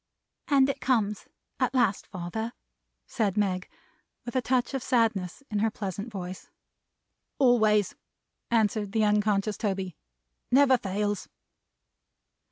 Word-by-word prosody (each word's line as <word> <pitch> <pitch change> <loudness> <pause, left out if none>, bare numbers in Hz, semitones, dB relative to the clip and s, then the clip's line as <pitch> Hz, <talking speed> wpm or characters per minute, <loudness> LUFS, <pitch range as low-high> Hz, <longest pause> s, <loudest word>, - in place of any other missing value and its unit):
"And 275 -2 +5
it 275 - -3
comes 215 -5 0 0.3
at - - 0
last, 230 -6 +2
father," 210 +6 -4 0.5
said 215 -5 -1
Meg, 185 -3 0 0.6
with 240 - -6
a 255 - +3
touch 250 +2 0
of 270 - -1
sadness 225 -4 0
in 210 - 0
her 220 +2 +2
pleasant 205 +1 -5
voice. 185 -2 -7 0.9
"Always," 215 -6 +4 0.6
answered 215 -3 +1
the 220 - +2
unconscious 210 0 +1
Toby. 190 -5 -2 0.5
"Never 265 -1 +5
fails." 205 +1 -2
210 Hz, 115 wpm, -28 LUFS, 195-245 Hz, 0.9 s, And